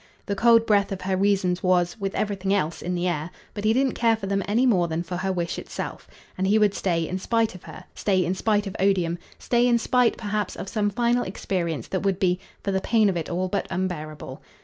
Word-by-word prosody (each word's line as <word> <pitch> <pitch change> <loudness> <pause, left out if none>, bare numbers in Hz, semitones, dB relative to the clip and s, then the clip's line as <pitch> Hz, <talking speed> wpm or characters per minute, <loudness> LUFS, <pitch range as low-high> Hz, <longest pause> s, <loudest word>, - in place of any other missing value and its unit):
The 200 - -2
cold 230 +2 +5
breath 200 -2 +2
of 195 - -4
her 190 0 0
reasons 190 -2 +1
was, 180 +1 +1
with 195 -1 -3
everything 195 -2 -1
else, 170 -4 -1
in 180 0 -2
the 175 +1 0
air; 160 -2 -2 0.2
but 205 0 -5
he 215 - +4
didn't 260 +2 +2
care 230 -1 +3
for 220 -3 -7
them 195 0 0
any 230 +5 +2
more 185 -9 +3
than 165 +1 -2
for 180 +1 -5
her 190 +1 -1
wish 175 -2 -2
itself, - - -6 0.3
and 190 +1 0
he 210 +2 +4
would 210 -2 +3
stay 165 -5 0
in 185 - -3
spite 230 +3 +1
of 185 - -11
her, - - -10
stay 185 -3 +1
in 180 - 0
spite 210 +1 +1
of 195 - -6
odium, 180 -3 +1 0.2
stay 240 0 +2
in 240 -1 +4
spite 250 +1 +2
perhaps 210 -3 -2
of - - -6
some 210 -2 0
final 240 +3 +1
experience 175 -4 -3
that 190 - -1
would 195 -2 +1
be, 180 -1 +1 0.2
for 200 - -1
the 190 0 0
pain 220 -1 +3
of 190 - -1
it, 165 -2 -3
all 180 +2 -1
but 200 0 -2
unbearable. 170 -4 -4
195 Hz, 240 wpm, -25 LUFS, 180-215 Hz, 0.3 s, cold